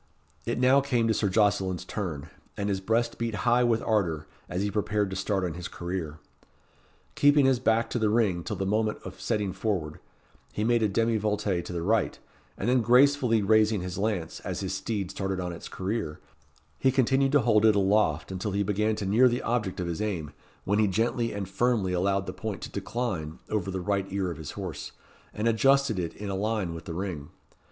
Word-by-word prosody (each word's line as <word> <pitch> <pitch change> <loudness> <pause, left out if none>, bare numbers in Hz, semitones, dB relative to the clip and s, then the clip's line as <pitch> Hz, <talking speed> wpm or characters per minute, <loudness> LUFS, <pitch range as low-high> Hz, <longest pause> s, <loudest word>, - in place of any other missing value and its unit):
It - - -1
now 130 +2 +5
came 125 -5 +1
to - - +4
Sir 105 -2 0
Jocelyn's 95 -3 +1
turn, 85 -8 -4 0.3
and 100 0 -1
his 95 -1 -1
breast 115 +4 0
beat 115 -2 -2
high 120 +1 +4
with 115 -2 +2
ardour, 85 -8 0 0.2
as 90 +2 -2
he 105 - -1
prepared 105 -1 0
to - - -3
start 95 0 -1
on 90 -3 -2
his 90 +2 -6
career. 85 -3 -5 1.0
Keeping 145 -1 +5
his 130 -2 +3
back 115 -2 +2
to 120 - 0
the 110 -1 +2
ring 105 -6 +1
till 105 - -4
the 95 0 -2
moment 105 +2 0
of - - -9
setting 105 -5 -1
forward, 85 -9 -2 0.5
he 105 - -2
made 120 +1 +3
a 110 - +3
demi 115 +3 +1
volte 105 -3 0
to - - -7
the 85 -1 -3
right, 110 +2 +1 0.4
and 100 - -3
then 125 0 +4
gracefully 125 -1 +4
raising 110 0 +3
his 90 +1 -5
lance, 100 -6 -2
as - - -4
his 95 -1 -3
steed 95 -1 -3
started 95 -1 -3
on 90 -1 -3
its 85 - -9
career, 95 -5 -3 0.6
he 130 - +4
continued 135 +1 +2
to 145 - +5
hold 110 -2 +3
it 110 -1 +5
aloft 95 -5 +2
until 95 +2 -3
he 100 +1 +1
began 105 +2 0
to 105 - -4
near 110 +7 +5
the 120 0 -1
object 110 -6 -1
of 90 - -1
his 85 +2 -3
aim, 85 -9 -3 0.3
when 100 +2 +1
he 110 - +4
gently 115 +4 0
and 100 -2 -4
firmly 100 -2 +1
allowed 95 +2 +1
the - - -5
point 110 -4 -5
to - - -7
decline 90 -10 -3
over 105 -3 -1
the 95 0 -3
right 100 +1 -1
ear 95 -2 -1
of - - -7
his 75 - -7
horse, - - -6 0.4
and 105 +2 -2
adjusted 135 -1 +3
it 85 -2 -3
in 100 -1 -5
a - - -2
line 105 -3 -1
with 80 0 -8
the 85 - -5
ring. 85 -6 -4
105 Hz, 210 wpm, -27 LUFS, 95-115 Hz, 1.0 s, now